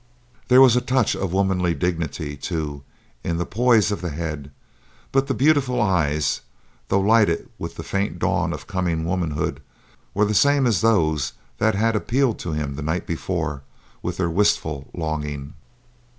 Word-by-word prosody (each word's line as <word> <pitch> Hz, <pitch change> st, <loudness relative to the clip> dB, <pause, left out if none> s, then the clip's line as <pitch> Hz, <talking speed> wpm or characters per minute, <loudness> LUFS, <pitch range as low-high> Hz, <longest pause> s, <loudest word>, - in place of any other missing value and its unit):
There 130 Hz, +1 st, +7 dB
was 130 Hz, -3 st, +7 dB
a 125 Hz, -, +3 dB
touch 125 Hz, -2 st, +1 dB
of 95 Hz, -3 st, -3 dB
womanly 95 Hz, -3 st, +1 dB
dignity, 80 Hz, -4 st, -2 dB
too, 75 Hz, -2 st, -4 dB, 0.4 s
in 85 Hz, -, -1 dB
the 85 Hz, -, -1 dB
poise 115 Hz, -1 st, +3 dB
of 100 Hz, -, -3 dB
the 90 Hz, -, -3 dB
head, 75 Hz, -2 st, -5 dB, 0.6 s
but 135 Hz, 0 st, +2 dB
the 135 Hz, -, 0 dB
beautiful 135 Hz, -3 st, +3 dB
eyes, 80 Hz, -, +1 dB, 0.5 s
though 100 Hz, -, +2 dB
lighted 105 Hz, -4 st, +3 dB
with 85 Hz, 0 st, -6 dB
the 80 Hz, -, -6 dB
faint 100 Hz, +4 st, -2 dB
dawn -, -, 0 dB
of -, -, -6 dB
coming 90 Hz, -5 st, -1 dB
womanhood, 85 Hz, -4 st, -2 dB, 0.5 s
were 105 Hz, +2 st, +3 dB
the 105 Hz, -, 0 dB
same 140 Hz, +4 st, +4 dB
as 110 Hz, -7 st, +2 dB
those 80 Hz, -10 st, +2 dB, 0.3 s
that 110 Hz, -1 st, +2 dB
had 115 Hz, +2 st, +2 dB
appealed 120 Hz, +3 st, +1 dB
to 85 Hz, -, -4 dB
him 75 Hz, -2 st, -2 dB
the -, -, -4 dB
night 80 Hz, +4 st, -2 dB
before 80 Hz, -4 st, -3 dB, 0.4 s
with -, -, -4 dB
their 90 Hz, -, +1 dB
wistful 85 Hz, -7 st, +1 dB
longing. 75 Hz, -3 st, -4 dB
90 Hz, 165 wpm, -23 LUFS, 80-110 Hz, 0.6 s, There